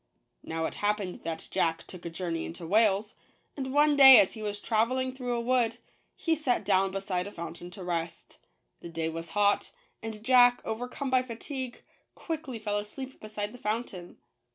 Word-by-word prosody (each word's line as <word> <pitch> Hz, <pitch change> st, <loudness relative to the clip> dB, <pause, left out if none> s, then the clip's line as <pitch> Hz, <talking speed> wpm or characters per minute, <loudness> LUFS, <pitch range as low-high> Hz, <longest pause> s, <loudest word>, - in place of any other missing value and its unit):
Now 160 Hz, 0 st, -3 dB
it -, -, -3 dB
happened 205 Hz, -3 st, -1 dB
that 165 Hz, -1 st, -4 dB
Jack 165 Hz, -1 st, 0 dB
took 175 Hz, -2 st, -9 dB
a -, -, -3 dB
journey 165 Hz, -1 st, -3 dB
into 170 Hz, +1 st, -7 dB
Wales; 210 Hz, +2 st, +2 dB, 0.4 s
and 265 Hz, -2 st, -4 dB
one 295 Hz, +1 st, +4 dB
day, 265 Hz, -2 st, +10 dB
as 190 Hz, -, +3 dB
he 220 Hz, -, -9 dB
was 205 Hz, -1 st, -3 dB
traveling 255 Hz, +4 st, 0 dB
through 250 Hz, -2 st, -3 dB
a -, -, -1 dB
wood, 235 Hz, -1 st, +1 dB, 0.4 s
he 330 Hz, -, 0 dB
sat 280 Hz, -8 st, 0 dB
down 195 Hz, -1 st, +3 dB
beside 190 Hz, -1 st, -2 dB
a -, -, -8 dB
fountain 170 Hz, 0 st, -7 dB
to 185 Hz, +1 st, -10 dB
rest. 170 Hz, -1 st, -4 dB, 0.4 s
The 170 Hz, -, -9 dB
day 165 Hz, -1 st, -2 dB
was 165 Hz, 0 st, -6 dB
hot; 205 Hz, 0 st, +2 dB, 0.3 s
and 220 Hz, -1 st, -7 dB
Jack, 245 Hz, 0 st, +6 dB
over 225 Hz, +3 st, -3 dB
come 265 Hz, +1 st, -5 dB
by 255 Hz, -1 st, +4 dB
fatigue, 255 Hz, +1 st, -6 dB, 0.3 s
quickly 315 Hz, -7 st, -5 dB
fell 210 Hz, -1 st, -1 dB
asleep 260 Hz, +6 st, -8 dB
beside 210 Hz, -1 st, -5 dB
the 250 Hz, -, -11 dB
fountain. 210 Hz, -5 st, -4 dB
215 Hz, 180 wpm, -29 LUFS, 180-250 Hz, 0.4 s, day